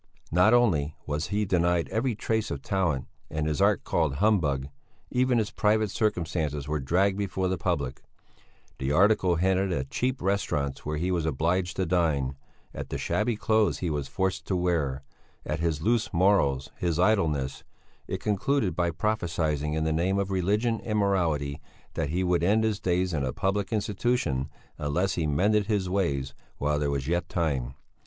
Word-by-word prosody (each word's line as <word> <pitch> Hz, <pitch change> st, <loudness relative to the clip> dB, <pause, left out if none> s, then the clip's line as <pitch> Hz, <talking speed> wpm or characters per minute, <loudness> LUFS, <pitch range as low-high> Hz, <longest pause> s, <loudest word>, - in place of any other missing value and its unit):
Not 90 Hz, +6 st, +5 dB
only 85 Hz, -12 st, +3 dB
was 75 Hz, +2 st, -2 dB
he 105 Hz, +1 st, 0 dB
denied 85 Hz, -2 st, +1 dB
every 115 Hz, +1 st, 0 dB
trace 110 Hz, +1 st, -1 dB
of -, -, -5 dB
talent 95 Hz, -, 0 dB, 0.2 s
and 75 Hz, 0 st, -2 dB
his 75 Hz, -2 st, -1 dB
art -, -, +3 dB
called 80 Hz, -5 st, 0 dB
humbug; 75 Hz, -8 st, +2 dB, 0.4 s
even 125 Hz, 0 st, +2 dB
his 110 Hz, 0 st, 0 dB
private 110 Hz, -2 st, +2 dB
circumstances 80 Hz, -9 st, -1 dB
were 75 Hz, 0 st, -1 dB
dragged 95 Hz, +8 st, +1 dB
before 95 Hz, -2 st, -1 dB
the 95 Hz, -, 0 dB
public; 70 Hz, -2 st, -2 dB, 0.8 s
the 65 Hz, +1 st, -1 dB
article 95 Hz, +1 st, +4 dB
hinted 95 Hz, +2 st, +1 dB
at 70 Hz, -5 st, -2 dB
cheap 125 Hz, 0 st, -1 dB
restaurants 75 Hz, -8 st, -1 dB
where 75 Hz, 0 st, -3 dB
he 90 Hz, +4 st, -1 dB
was 85 Hz, -3 st, 0 dB
obliged 85 Hz, +4 st, 0 dB
to 95 Hz, -, 0 dB
dine; 80 Hz, -6 st, +1 dB, 0.4 s
at -, -, -6 dB
the -, -, -3 dB
shabby 110 Hz, +2 st, 0 dB
clothes 110 Hz, 0 st, +2 dB
he 85 Hz, -3 st, -2 dB
was 70 Hz, -2 st, -2 dB
forced 95 Hz, +6 st, -2 dB
to 95 Hz, -, 0 dB
wear; 80 Hz, -7 st, 0 dB, 0.4 s
at 75 Hz, -, -2 dB
his 80 Hz, -2 st, -1 dB
loose 115 Hz, +1 st, +1 dB
morals, 85 Hz, -8 st, +2 dB
his 85 Hz, -3 st, -1 dB
idleness; 80 Hz, -9 st, +1 dB, 0.4 s
it -, -, -3 dB
concluded 105 Hz, +1 st, 0 dB
by 85 Hz, -1 st, +1 dB
prophesying 80 Hz, -5 st, -1 dB
in 80 Hz, -, 0 dB
the 80 Hz, 0 st, +1 dB
name 90 Hz, +5 st, +1 dB
of 100 Hz, 0 st, -1 dB
religion 105 Hz, +5 st, +1 dB
and 105 Hz, -1 st, -1 dB
morality 80 Hz, -8 st, 0 dB, 0.3 s
that 70 Hz, -, -2 dB
he 90 Hz, +4 st, 0 dB
would 90 Hz, -2 st, +2 dB
end 105 Hz, +5 st, +3 dB
his 110 Hz, -2 st, 0 dB
days 90 Hz, -1 st, 0 dB
in 75 Hz, -3 st, 0 dB
a 65 Hz, -, -1 dB
public 95 Hz, -, -1 dB
institution 100 Hz, -, 0 dB, 0.3 s
unless 85 Hz, +6 st, 0 dB
he 80 Hz, -3 st, -1 dB
mended 100 Hz, +8 st, +2 dB
his 100 Hz, -4 st, 0 dB
ways 70 Hz, -8 st, -1 dB, 0.2 s
while 75 Hz, +1 st, 0 dB
there 75 Hz, -1 st, 0 dB
was 70 Hz, -1 st, -2 dB
yet 85 Hz, +1 st, -1 dB
time. 70 Hz, -7 st, -1 dB
90 Hz, 175 wpm, -27 LUFS, 75-100 Hz, 0.8 s, Not